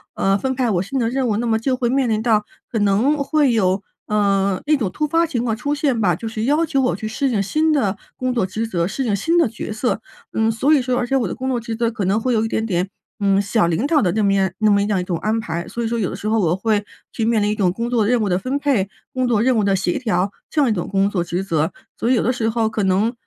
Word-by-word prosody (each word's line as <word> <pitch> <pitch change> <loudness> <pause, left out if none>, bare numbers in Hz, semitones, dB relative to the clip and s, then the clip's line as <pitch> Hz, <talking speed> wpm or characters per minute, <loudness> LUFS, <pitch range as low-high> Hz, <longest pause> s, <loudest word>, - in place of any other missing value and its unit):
呃， 195 0 +2
分 260 +4 -1
派 250 -2 +1
我 175 -2 +1
新 260 +7 -3
的 230 - +1
任 255 +1 0
务， 210 - +1
那 240 - -1
么 220 -1 +2
就 255 +2 0
会 240 - 0
面 260 -1 +1
临 215 0 +1
到 220 -3 +2 0.3
可 230 - -3
能 210 +9 +2
会 285 -3 +2
有， 190 -2 +2 0.3
呃， 200 -2 +1
那 305 - +4
种 220 -10 -2
突 300 - -1
发 330 +3 +2
情 250 -7 -2
况 225 -2 0
出 285 +5 -2
现 275 -6 0
吧， 180 -3 +3
就 225 +8 -5
是 220 0 -4
要 300 +6 +2
求 275 -3 0
我 250 - +1
去 220 - -4
适 260 +5 -1
应 215 -5 +1
新 310 +10 +1
的 215 -10 +1 0.2
工 255 -1 -1
作 230 -6 +1
职 220 +4 -3
责， 170 -5 -1
适 250 +8 -3
应 205 -3 +1
新 335 - +1
的 330 - +4
角 215 0 -6
色。 225 0 -1 0.3
嗯， 225 0 +2
所 270 +8 +2
以 280 - +4
说 250 0 -1
而 245 - -1
且 270 - 0
我 255 - +2
的 180 - -3
工 260 +1 -5
作 255 - 0
职 230 0 -5
责 230 0 0
可 220 -3 -4
能 195 +4 +2
会 250 +2 0
有 220 -1 +2
一 - - 0
点 220 0 -1
点， 185 -2 -1 0.3
嗯， 200 -1 +3
小 200 -2 +1
领 170 +9 0
导 305 -2 +3
的 180 -4 +2
那 215 -1 +1
么 195 0 +3
样 190 -1 +2
那 215 - +3
么 200 0 +4
这 205 - 0
样 205 - +1
儿 - - 0
一 - - -3
种 180 -1 -2
安 220 +2 0
排， 170 -4 -4
所 235 - -4
以 - - 0
说 235 - -1
有 190 - 0
的 - - -5
时 215 - -5
候 220 +1 +2
我 175 -2 +2
会 210 +1 0 0.3
去 225 - -3
面 225 -1 +2
临 210 - +1
一 - - -1
种 185 -4 +2
工 230 +5 -3
作 230 -4 +2
任 245 +1 +3
务 205 - 0
的 180 - +2
分 255 +7 -2
配， 245 -10 +1 0.2
工 255 -1 0
作 225 -4 +2
任 255 -1 +3
务 215 - +2
的 195 -1 +2
协 185 -2 0
调 200 -5 0 0.2
这 305 - -1
样 270 - +3
一 220 - +2
种 175 - -3
工 195 0 +2
作 180 -4 -1
职 175 +2 -3
责， 160 -4 0 0.3
所 235 - 0
以 - - +4
有 - - +1
的 250 - +2
时 225 -2 -1
候 225 -1 +1
可 220 -1 -2
能 195 +5 +2
220 Hz, 335 characters per minute, -20 LUFS, 195-250 Hz, 0.3 s, 那